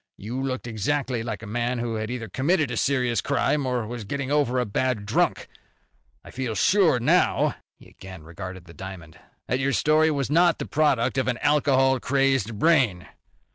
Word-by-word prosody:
You 120 +6 -5
looked 130 -2 -3
exactly 125 +2 -2
like 115 -1 -5
a - - -6
man 120 +3 -2
who 120 -1 -3
had 110 0 -3
either 120 -2 -5
committed 150 - 0
a - - -3
serious 125 -3 +1
crime, 140 0 0
or 125 -3 -1
was 120 0 -6
getting 140 +6 -4
over 145 -4 +1
a 125 - +1
bad 110 0 -1
drunk. - - 0 0.8
I - - -11
feel 125 -4 -4
sure 185 - +3
now" 120 - +2 0.2
he - - -17
again 95 -4 -12
regarded 90 +2 -9
the 85 - -14
diamond 85 -2 -10 0.3
"that 125 - -1
your 135 +1 0
story 155 +3 +3
was 140 -3 -2
not 170 +1 +4
the - - -5
product 140 -4 +1
of 130 - -1
an 125 -2 0
alcohol 135 -3 +2
crazed 135 -5 0
brain. 125 - +2
125 Hz, 180 wpm, -24 LUFS, 110-140 Hz, 0.8 s, not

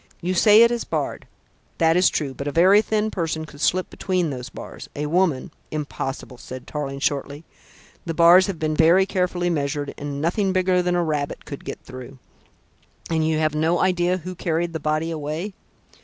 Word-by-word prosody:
You 180 +2 -2
say 210 +4 +7
it 235 - +4
is 240 -1 -1
barred - - -3 0.5
that 165 -1 +3
is 180 +1 +5
true, 140 -3 -2
but 140 +2 -6
a - - -1
very 185 +6 +5
thin 215 0 -1
person 160 -3 -2
could 145 -1 -13
slip 185 +3 +1
between 180 -4 -1
those 125 -1 -6
bars. - - -10
A 150 - -2
woman 165 -1 +1
" - - -38
"Impossible," 135 -4 -5
said 130 0 -9
Tarling 140 -2 -4
shortly. 140 +2 -2 0.6
"The 165 - -2
bars 175 +3 +7
have 195 -4 -3
been 155 0 -1
very 170 +5 +5
carefully 180 -2 -1
measured, 145 -2 -2
and 145 -1 -4
nothing 185 +5 0
bigger 185 -1 +2
than 180 0 0
a 175 - +2
rabbit 150 -3 -3
could 140 - -8
get - - -6
through. 130 +1 -10 0.9
And 160 -1 +1
you 160 -1 +1
have 155 -1 +1
no 160 +3 +1
idea 180 0 +1
who 185 +1 -7
carried 170 -1 -2
the 160 - -3
body 155 +2 -1
away?" 160 +6 -4
165 Hz, 190 wpm, -23 LUFS, 145-180 Hz, 0.9 s, say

